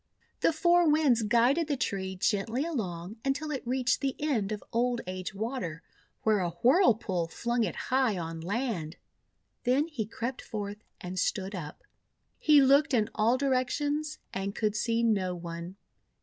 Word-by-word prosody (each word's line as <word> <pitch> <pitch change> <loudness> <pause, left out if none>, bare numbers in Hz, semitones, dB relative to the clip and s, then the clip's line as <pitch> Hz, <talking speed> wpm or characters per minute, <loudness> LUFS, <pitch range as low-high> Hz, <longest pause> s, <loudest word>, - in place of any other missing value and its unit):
The - - +3
Four 345 +1 +4
Winds 295 -6 +4
guided 240 +9 +3
the 290 -3 -1
tree 190 -5 -2
gently 225 +8 0
along 195 - -4
until 290 +3 -1
it 270 - -2
reached 255 0 +1
the 270 -2 -1
end 240 -10 0
of 210 - -4
Old 240 +1 +1
Age 185 +1 -5
Water, 200 -7 -4 0.4
where 215 -2 +3
a 180 -2 0
whirlpool 230 - +3
flung 235 +7 -1
it 190 - -2
high 255 -6 +1
on 165 -1 -5
land. 190 -4 -2 0.7
Then 260 +5 +3
he 255 -11 -4
crept 235 +3 -4
forth 205 -1 -6 0.2
and 180 +1 -5
stood 190 +2 -1
up. 160 -6 -7 0.6
He 295 -3 +6
looked 275 0 +4
in 215 -2 +1
all 225 +4 +3
directions 290 +3 0 0.2
and 195 +1 -3
could 215 -2 0
see 230 +2 +1
no 195 -5 +1
one. 170 +1 -7
230 Hz, 155 wpm, -29 LUFS, 190-270 Hz, 0.7 s, He